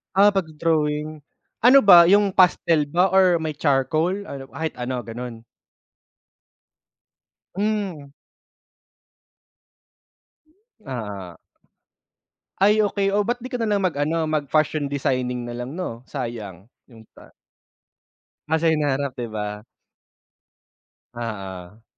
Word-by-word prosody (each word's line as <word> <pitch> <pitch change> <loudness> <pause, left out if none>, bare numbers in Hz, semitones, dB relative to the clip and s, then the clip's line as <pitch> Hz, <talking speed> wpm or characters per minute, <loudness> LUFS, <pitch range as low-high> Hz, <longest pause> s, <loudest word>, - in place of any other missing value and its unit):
Ah, 205 +2 +6
pagdo-drawing. 155 -3 -1 0.4
Ano 265 +4 +6
ba, 175 -4 +8
yung 200 0 +4
pastel 170 -4 +3
ba 180 +5 +2
or 185 -2 +5
may 160 -1 -2
charcoal? 155 +6 0
Ano, 135 -8 -8
kahit 160 +3 -4
ano, 125 0 -3
gano'n? 115 0 -8 2.1
Hmm. 200 -7 -2 2.8
Ah. 105 -9 -6 1.2
Ay, 210 +3 +4
okey. 200 -1 +1
Oh, 205 +1 +2
ba't 240 +1 -1
'di 255 - -7
ka 250 - -3
na 225 - -1
lang 205 -2 0
mag-ano, 160 -1 0
mag-fashion 155 0 0
designing 125 -3 -2
na 120 - -6
lang 125 +5 -6
'no, 130 -9 -6
sayang. 115 - -7 0.2
Yun 115 -3 -16
pa. - - -17 1.2
Ah, 160 0 +1
sa 165 - +3
hinaharap, 145 -3 0
'di 120 - -3
ba? 105 0 -5 1.5
Oo. 105 -3 -7
150 Hz, 105 wpm, -22 LUFS, 125-185 Hz, 2.8 s, ba